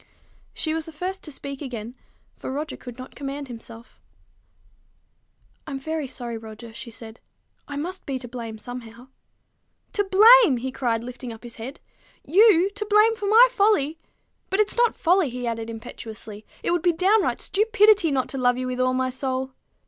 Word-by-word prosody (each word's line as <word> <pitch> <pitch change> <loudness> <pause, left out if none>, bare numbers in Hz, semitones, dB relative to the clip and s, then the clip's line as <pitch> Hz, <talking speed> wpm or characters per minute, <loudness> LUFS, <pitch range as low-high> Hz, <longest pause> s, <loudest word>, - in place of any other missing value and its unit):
She 315 - -1
was 320 0 -3
the - - -7
first 370 +5 -4
to 305 - -7
speak 275 0 -7
again, 240 -4 -6 0.4
for - - -6
Roger 295 +3 -4
could 245 -1 -10
not 255 0 -9
command 280 0 -5
himself. 230 0 -12 1.7
"I'm 280 -2 -4
very 315 +1 -3
sorry, 240 -3 -6
Roger," 220 +1 -10
she 235 - -8
said. 225 0 -10 0.5
"I 285 - -6
must 360 +6 -5
be 270 -2 -1
to 250 -1 -7
blame 230 -2 -7
somehow." 245 +1 -9 0.8
"To 410 - +2
blame!" 410 - +7
he 260 +2 -4
cried, 235 -3 -1
lifting 250 0 -7
up 225 +1 -11
his 235 -1 -10
head. 255 +6 -7 0.5
"You 390 +1 +5
to 410 +1 -4
blame 425 +2 +5
for 415 -2 -4
my 455 +4 +8
folly! 395 - +2 0.5
But 385 - 0
it's 425 - +2
not 480 -1 +3
folly," 355 -3 +3
he 245 0 -5
added 230 -1 -3
impetuously: 220 -2 -9 0.2
"it - - 0
would 350 -1 +1
be 350 0 +3
downright 385 +5 +2
stupidity 420 -3 +4
not 265 -3 0
to 270 - -4
love 245 -1 +3
you 255 - -2
with 255 0 -3
all 255 0 +2
my 260 0 0
soul." 260 0 -3
270 Hz, 180 wpm, -24 LUFS, 240-370 Hz, 1.7 s, my